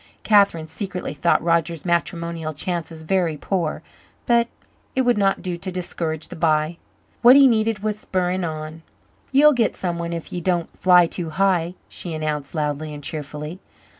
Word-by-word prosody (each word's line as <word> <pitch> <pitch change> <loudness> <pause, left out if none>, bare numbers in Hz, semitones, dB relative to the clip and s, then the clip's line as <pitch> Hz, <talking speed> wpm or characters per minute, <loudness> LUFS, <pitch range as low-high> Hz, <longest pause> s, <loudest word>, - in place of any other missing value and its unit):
Catherine 200 -7 +4
secretly 180 +2 -5
thought 155 +3 +2
Roger's 170 -1 0
matrimonial 170 -2 -1
chances 165 0 -4
very 170 -2 0
poor, 165 -2 -2 0.4
but 235 -1 +3 0.5
it 260 - +3
would 245 -1 +3
not 195 -1 +1
do 180 -2 -3
to 185 +2 -5
discourage 165 -3 -4
the - - -8
b'y. 155 0 +1 0.4
What 245 +2 +8
he 280 0 +8
needed 220 -4 +2
was 215 -1 -1
spurring 185 -2 -1
on. 155 0 -5 0.5
"Ye'll 295 +3 +6
git 235 -4 +1
someone 170 -2 -3
if 170 -1 -6
ye 175 - -3
don't 175 -1 -1
fly 180 -1 +6
too 170 0 -4
high," 180 0 +1
she 170 -3 -5
announced 150 -1 -3
loudly 150 0 -2
and 145 - -10
cheerfully. 150 +3 -5
170 Hz, 160 wpm, -22 LUFS, 155-190 Hz, 0.5 s, What